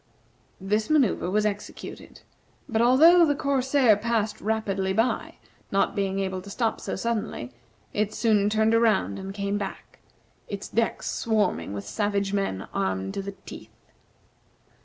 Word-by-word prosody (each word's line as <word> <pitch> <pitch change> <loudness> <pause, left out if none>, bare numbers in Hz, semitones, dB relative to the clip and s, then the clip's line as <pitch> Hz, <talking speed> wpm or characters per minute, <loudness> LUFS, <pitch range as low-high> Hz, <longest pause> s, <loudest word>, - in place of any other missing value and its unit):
This 210 +3 -1
manoeuvre 270 - +2
was 210 +2 +1
executed, 205 -1 -6 0.5
but, 225 -1 0
although 315 +9 +7
the 295 -3 +3
corsair 265 -4 +3
passed 220 0 -1
rapidly 195 -3 -1
by, 225 +5 0 0.4
not 195 - +1
being 195 -1 -1
able 190 -1 -2
to 200 - -11
stop 225 +2 -1
so - - -3
suddenly, 215 - -3 0.4
it 210 0 0
soon 210 -3 +2
turned 220 +1 +2
around 230 -4 +2
and 190 0 -6
came 200 0 -2
back, 195 - -7 0.5
its 200 -1 -5
decks 230 0 -1
swarming 215 - 0
with 100 0 -5
savage 200 - -1
men 195 - -2
armed 95 0 -1
to - - -3
the 200 0 -6
teeth. - - -13
210 Hz, 140 wpm, -26 LUFS, 195-230 Hz, 0.5 s, although